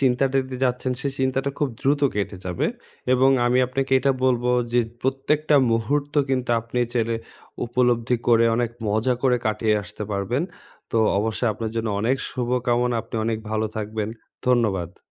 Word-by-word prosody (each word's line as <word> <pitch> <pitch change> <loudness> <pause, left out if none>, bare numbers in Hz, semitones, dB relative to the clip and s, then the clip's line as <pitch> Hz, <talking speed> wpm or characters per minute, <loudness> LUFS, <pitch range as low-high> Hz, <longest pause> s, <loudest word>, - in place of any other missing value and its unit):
চিন্তাটা 135 +1 +2
দিয়ে 130 0 -6
যাচ্ছেন 125 0 0
সেই 140 0 -2
চিন্তাটা 130 +1 0
খুব 145 - +1
দ্রুত 140 +2 +2
কেটে 100 -1 -2
যাবে। 90 -2 -1 0.5
এবং 130 +1 +5 0.2
আমি 125 +1 +3
আপনাকে 135 +1 -2
এটা 135 +1 +2
বলবো, 125 -1 +2 0.2
যে 120 - +4 0.2
প্রত্যেকটা 145 +3 +1 0.2
মুহূর্ত 140 +6 0 0.2
কিন্তু 130 -2 0
আপনি 115 +2 -4
চাইলে 115 -1 0 0.5
উপলব্ধি 120 0 +2
করে, 115 -1 +5
অনেক 120 -1 0 0.2
মজা 110 +5 +1
করে 125 -2 +4
কাটিয়ে 110 0 +1
আসতে 100 - -8
পারবেন। 105 - -1 0.5
তো 115 - +1 0.2
অবশ্যই 110 +3 0
আপনার 110 +1 -4
জন্য 115 0 -1
অনেক 120 +5 +2
শুভকামনা, 125 -1 0
আপনি 115 - -13
অনেক 115 -1 0
ভালো 110 0 0
থাকবেন। 110 0 -3 0.4
ধন্যবাদ। 100 -8 +1
120 Hz, 155 wpm, -23 LUFS, 110-130 Hz, 0.5 s, এবং